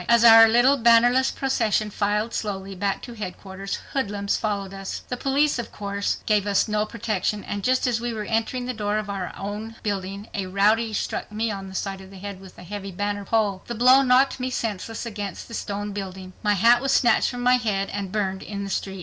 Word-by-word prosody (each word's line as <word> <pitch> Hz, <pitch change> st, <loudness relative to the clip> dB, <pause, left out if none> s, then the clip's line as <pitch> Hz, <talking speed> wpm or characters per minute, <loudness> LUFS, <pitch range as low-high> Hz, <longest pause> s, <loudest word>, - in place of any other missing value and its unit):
As 235 Hz, 0 st, +5 dB
our 225 Hz, -1 st, +10 dB
little, 240 Hz, +5 st, +4 dB
bannerless 240 Hz, +2 st, +5 dB
procession 220 Hz, -5 st, 0 dB
filed 210 Hz, +3 st, -1 dB
slowly 195 Hz, -2 st, -4 dB
back 195 Hz, +1 st, -2 dB
to 240 Hz, -, -8 dB
headquarters, 195 Hz, -2 st, -6 dB, 0.2 s
hoodlums 205 Hz, -6 st, -1 dB
followed 200 Hz, -3 st, -2 dB
us. 195 Hz, 0 st, -6 dB
The 250 Hz, -, -1 dB
police 275 Hz, +2 st, +1 dB
of 235 Hz, -, -5 dB
course 200 Hz, -1 st, -2 dB
gave 210 Hz, -2 st, +2 dB
us 200 Hz, +2 st, +2 dB
no 210 Hz, 0 st, 0 dB
protection 210 Hz, -2 st, -2 dB
and 205 Hz, -1 st, -5 dB
just 255 Hz, +3 st, +2 dB
as 235 Hz, -2 st, 0 dB
we 240 Hz, 0 st, -2 dB
were 215 Hz, -2 st, -4 dB
entering 225 Hz, +3 st, -1 dB
the 255 Hz, -, -3 dB
door 210 Hz, -2 st, -1 dB
of 210 Hz, -1 st, -3 dB
our 190 Hz, -2 st, -4 dB
own 210 Hz, +3 st, -5 dB
building 200 Hz, 0 st, -3 dB
a 195 Hz, -2 st, -3 dB
rowdy 210 Hz, +4 st, +2 dB
struck 210 Hz, -, -3 dB
me 220 Hz, +1 st, -1 dB
on 195 Hz, -1 st, -6 dB
the 190 Hz, -, -10 dB
side 195 Hz, 0 st, -3 dB
of 190 Hz, -, -12 dB
the 195 Hz, -, -12 dB
head 200 Hz, 0 st, -7 dB
with 190 Hz, -1 st, -14 dB
a -, -, -11 dB
heavy 195 Hz, +1 st, -6 dB
banner 205 Hz, +2 st, -3 dB
pole. 205 Hz, -3 st, +1 dB
The 240 Hz, -, -4 dB
blow 255 Hz, +4 st, +6 dB
knocked 260 Hz, +1 st, +3 dB
me 255 Hz, 0 st, -2 dB
senseless 225 Hz, -2 st, -3 dB
against 205 Hz, -4 st, -6 dB
the 230 Hz, -, -11 dB
stone 205 Hz, -1 st, -4 dB
building; 190 Hz, -2 st, -7 dB
my 210 Hz, -1 st, +2 dB
hat 235 Hz, +5 st, +5 dB
was 275 Hz, 0 st, 0 dB
snatched 245 Hz, -3 st, +4 dB
from 245 Hz, -1 st, -5 dB
my 250 Hz, +1 st, +5 dB
head, 205 Hz, -5 st, -1 dB
and 200 Hz, -2 st, -4 dB
burned 190 Hz, -2 st, -1 dB
in 200 Hz, -1 st, -5 dB
the 195 Hz, -, -5 dB
street. 195 Hz, 0 st, -3 dB
210 Hz, 220 wpm, -24 LUFS, 195-235 Hz, 0.2 s, our